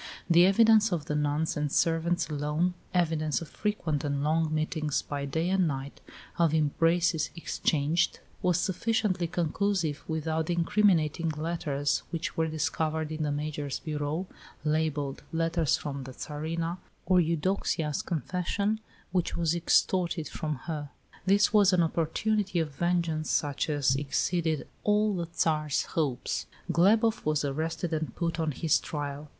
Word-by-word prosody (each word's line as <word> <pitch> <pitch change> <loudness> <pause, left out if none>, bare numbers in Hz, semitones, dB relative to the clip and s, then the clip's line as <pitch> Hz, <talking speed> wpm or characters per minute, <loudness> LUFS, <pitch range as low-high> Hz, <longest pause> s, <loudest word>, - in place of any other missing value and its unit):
The 175 +1 +6
evidence 220 +1 +5
of 165 -4 -1
the - - -2
nuns 150 +1 0
and 150 -1 -1
servants 170 +2 +1
alone 150 +4 0 0.2
evidence 160 -4 +1
of 165 - -8
frequent 175 -9 -2
and 140 -1 -1
long 155 +1 +1
meetings 155 -1 -1
by 140 -1 -4
day 160 +5 -1
and 190 -2 +3
night, 135 -1 -5 0.4
of 165 -2 +3
embraces 165 +2 +2
exchanged 160 -1 0 0.2
was 180 -2 +2
sufficiently 190 -2 0
conclusive, 170 -2 -1
without 160 0 -1
the 175 - +1
incriminating 170 -3 +2
letters 150 -3 -1
which 165 -2 -3
were 160 0 +1
discovered 155 0 -1
in 155 0 -4
the 150 -1 0
Major's 145 -1 -3
bureau, 150 +3 -3 0.4
labelled 150 -2 0
"Letters 165 -1 +1
from 140 -2 -5
the 130 - -8
Tsarina," 165 +5 -4 0.3
or 185 -1 +4
Eudoxia's 165 -2 0
confession 185 +6 -1 0.3
which 180 -2 0
was 165 -1 +1
extorted 170 -1 +2
from 155 -2 -3
her. 150 -3 -4 0.4
This 200 +2 +4
was 200 -3 +6
an 175 -2 +4
opportunity 185 +5 0
of 160 -3 -1
vengeance 170 -1 0
such 145 +1 0
as 140 -3 +2
exceeded 155 +3 0 0.2
all 210 0 +2
the 170 -2 -3
Tsar's 155 -3 0
hopes. 140 -6 -1 0.2
Glebof 220 +7 +3
was 155 -1 +1
arrested 160 +4 -2
and 160 0 -2
put 170 -1 -2
on 160 -2 0
his 155 +2 +2
trial. 145 0 -5
160 Hz, 140 wpm, -29 LUFS, 150-175 Hz, 0.4 s, The